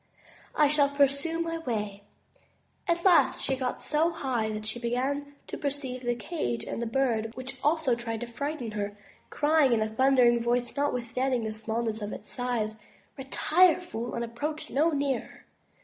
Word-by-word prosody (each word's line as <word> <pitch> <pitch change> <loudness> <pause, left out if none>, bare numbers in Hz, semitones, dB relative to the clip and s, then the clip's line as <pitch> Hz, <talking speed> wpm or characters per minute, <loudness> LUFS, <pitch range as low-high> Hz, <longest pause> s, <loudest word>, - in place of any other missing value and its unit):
I 300 - +5
shall 285 -1 +4
pursue 280 +3 +1
my 330 0 -2
way.'' 210 -8 -3 0.9
At 340 +1 0
last 365 -2 +5
she 270 - +1
got 255 -1 -2
so 315 +2 +1
high 260 -9 -1
that 215 0 -5
she 220 +3 -3
began 275 +4 -2
to - - -7
perceive 275 -3 -3
the 240 -1 0
cage 180 - -3
and 230 -1 -4
Bird 230 -4 +1
which 260 +1 -6
also 305 -3 +2
tried 230 -2 -3
to - - -2
frighten 260 0 -4
her, 205 -1 -4 0.3
crying 295 -3 +3
in 225 - +2
a - - -1
thundering 245 0 +4
voice, 240 +1 0
notwithstanding 255 -2 0
the 220 - -2
smallness 220 0 -2
of 205 0 -4
its 210 - -8
size, 235 -4 -1 0.4
"Retire, 315 +6 +3
fool, 240 -10 -5
and 235 - -1
approach 295 +7 -4
no 305 +5 +3
nearer." 280 -5 -2
255 Hz, 165 wpm, -28 LUFS, 230-290 Hz, 0.9 s, I